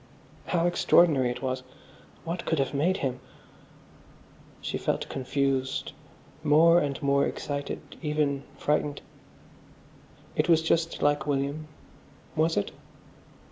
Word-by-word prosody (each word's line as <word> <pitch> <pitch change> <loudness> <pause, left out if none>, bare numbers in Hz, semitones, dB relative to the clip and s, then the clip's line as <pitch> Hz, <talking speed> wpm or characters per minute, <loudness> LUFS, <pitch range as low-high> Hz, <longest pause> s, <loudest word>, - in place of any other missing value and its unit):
How 170 -2 +1
extraordinary 165 -6 +4
it 125 +1 -5
was.... 130 0 -1 0.6
What 170 +2 -4
could 160 - 0
have 135 0 0
made 170 +7 +2
him...? 130 -1 -2 1.4
She - - -3
felt - - -1
confused, 135 0 -1 0.5
more 160 +3 +6
and 140 -3 -2
more 140 0 +3
excited, 145 0 -4 0.2
even 150 -3 0 0.2
frightened. 150 -1 0 1.3
It - - +1
was 165 -1 +5
just 165 0 0
like 145 +1 +2
William. 145 +2 -1 0.7
Was 160 +1 +2
it? 100 - 0
145 Hz, 110 wpm, -27 LUFS, 135-160 Hz, 1.4 s, more